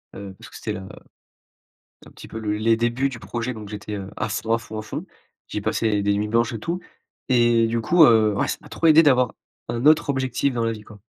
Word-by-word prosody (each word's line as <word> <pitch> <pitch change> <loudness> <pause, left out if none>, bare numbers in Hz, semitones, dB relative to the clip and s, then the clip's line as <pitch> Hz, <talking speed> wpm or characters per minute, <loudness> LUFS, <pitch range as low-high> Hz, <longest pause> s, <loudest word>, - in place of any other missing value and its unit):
Heu, 100 -1 -8
parce - - -12
que - - -15
c'était - - -5
la 95 0 -7 1.2
un - - -13
petit - - -12
peu 110 - -7
le 105 -2 -2
les 115 +1 +2
débuts 120 +4 0
du 125 -4 -8
projet 115 +4 -4
donc 105 -2 -9
j'étais, 105 0 -6
heu, 100 -2 -6
à 110 - -2
fond 110 +1 -2
à 115 - +3
fond 110 -1 -8
à - - -4
fond. 110 - -6 0.4
J'ai - - -4
passé 110 -3 0
des 100 0 +2
nuits 105 +1 -1
blanches 115 +3 +1
et 115 - -5
tout 170 +9 -3 0.5
et 120 -2 +4
du 115 +1 -1
coup, 165 +9 +5
heu, 110 -5 +5
ouais - - +1
ça - - -3
m'a - - -15
trop 165 - -1
aidé 160 0 +8
d'avoir 125 -5 +3 0.4
un 120 +1 -3
autre 155 -1 +5
objectif 130 0 -1
dans 115 -1 0
la 115 - +1
vie 110 -1 -9
quoi. 105 -1 -15
115 Hz, 250 wpm, -23 LUFS, 105-125 Hz, 1.2 s, aidé